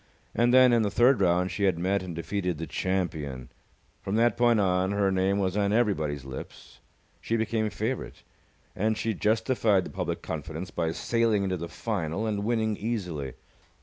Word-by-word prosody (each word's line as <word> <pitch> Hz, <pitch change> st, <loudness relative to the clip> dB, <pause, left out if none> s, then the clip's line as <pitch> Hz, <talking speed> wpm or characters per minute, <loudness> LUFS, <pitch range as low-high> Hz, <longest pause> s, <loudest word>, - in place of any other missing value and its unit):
And 120 Hz, +1 st, +3 dB
then, 130 Hz, -1 st, +7 dB
in 115 Hz, -, +4 dB
the 105 Hz, -, +1 dB
third 120 Hz, +3 st, +4 dB
round, 90 Hz, 0 st, +2 dB
she 100 Hz, -, 0 dB
had 95 Hz, -4 st, +2 dB
met 95 Hz, +3 st, 0 dB
and 90 Hz, -3 st, -6 dB
defeated 90 Hz, 0 st, -2 dB
the 80 Hz, -, -4 dB
champion. 80 Hz, -10 st, -3 dB, 0.5 s
From 100 Hz, -, -2 dB
that 115 Hz, 0 st, +3 dB
point 120 Hz, -2 st, +3 dB
on, 95 Hz, 0 st, +1 dB
her 100 Hz, -1 st, +2 dB
name 95 Hz, +1 st, +1 dB
was 95 Hz, -2 st, 0 dB
on 100 Hz, -1 st, +1 dB
everybody's 80 Hz, -, 0 dB
lips. 65 Hz, -1 st, -9 dB, 0.4 s
She 115 Hz, -, -1 dB
became 110 Hz, -1 st, 0 dB
favourite. 115 Hz, +5 st, -4 dB, 0.5 s
And 110 Hz, +2 st, 0 dB
she 110 Hz, 0 st, -1 dB
justified 110 Hz, -1 st, +2 dB
the -, -, -8 dB
public -, -, -3 dB
confidence 80 Hz, +3 st, -5 dB
by 80 Hz, -2 st, -1 dB
sailing 115 Hz, 0 st, +1 dB
into 95 Hz, -1 st, -1 dB
the 85 Hz, 0 st, -6 dB
final 95 Hz, 0 st, -3 dB
and 105 Hz, -2 st, -1 dB
winning 110 Hz, -2 st, 0 dB
easily. 90 Hz, -, -3 dB
100 Hz, 175 wpm, -27 LUFS, 90-110 Hz, 0.5 s, then